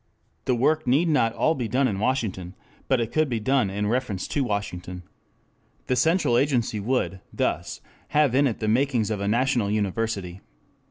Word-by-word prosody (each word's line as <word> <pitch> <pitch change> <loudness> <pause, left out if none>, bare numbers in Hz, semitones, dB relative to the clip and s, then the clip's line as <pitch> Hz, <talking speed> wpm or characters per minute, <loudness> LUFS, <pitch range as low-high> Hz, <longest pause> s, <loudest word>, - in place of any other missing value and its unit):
The 125 - +2
work 150 +4 +1
need 150 +7 +3
not 130 -7 +3
all 160 - +2
be 125 -6 -3
done 130 +5 +2
in 100 -5 -2
Washington, 100 -7 -2 0.3
but 130 -2 +2
it 115 -1 -2
could 155 -2 +1
be 120 -3 -1
done 125 -2 +1
in 100 +2 -2
reference 110 -4 -1
to 145 - 0
Washington. 90 -5 -4 0.8
The 125 - 0
central 130 -3 +3
agency 125 -6 0
would, 100 -5 -1
thus, - - -2 0.3
have 150 -4 +2
in 140 +2 +4
it 115 - -2
the 110 - -3
makings 120 -2 +1
of 105 -2 -2
a 100 - -1
national 120 -1 +1
university. 100 -3 -2
115 Hz, 175 wpm, -25 LUFS, 105-135 Hz, 0.8 s, in